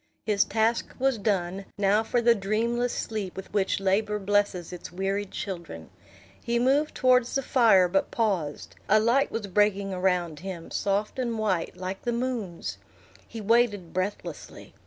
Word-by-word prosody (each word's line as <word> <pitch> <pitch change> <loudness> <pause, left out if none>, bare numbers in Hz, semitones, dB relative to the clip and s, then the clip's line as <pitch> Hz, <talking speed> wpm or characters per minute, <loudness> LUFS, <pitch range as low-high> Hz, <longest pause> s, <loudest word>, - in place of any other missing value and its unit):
His 205 -2 +3
task 225 +2 0
was 265 -3 +1
done; 195 -2 -1
now 205 +1 +3
for 235 +2 0
the 235 0 +6
dreamless 230 +4 0
sleep 210 -5 -4
with 190 - -9
which 195 -2 +1
labor 205 +2 +1
blesses 200 -3 0
its 175 - -8
wearied 195 +2 -2
children! 170 - -7 0.5
He 235 0 0
moved 275 +5 +2
towards 250 -1 +3
the 275 - +1
fire, 225 -9 +5
but 195 +2 0
paused; 185 -10 -2 0.2
a 215 - +6
light 240 +6 +2
was 225 -2 -3
breaking 200 0 +1
around 180 -4 0
him, 180 -3 -7
soft 205 +5 -1
and 235 -3 -1
white, 190 -6 -1
like 185 +1 -5
the 240 - -1
moon's. 235 -8 -3 0.5
He 225 - -7
waited 210 -5 +2
breathlessly. 185 +3 -5
205 Hz, 155 wpm, -27 LUFS, 190-230 Hz, 0.5 s, the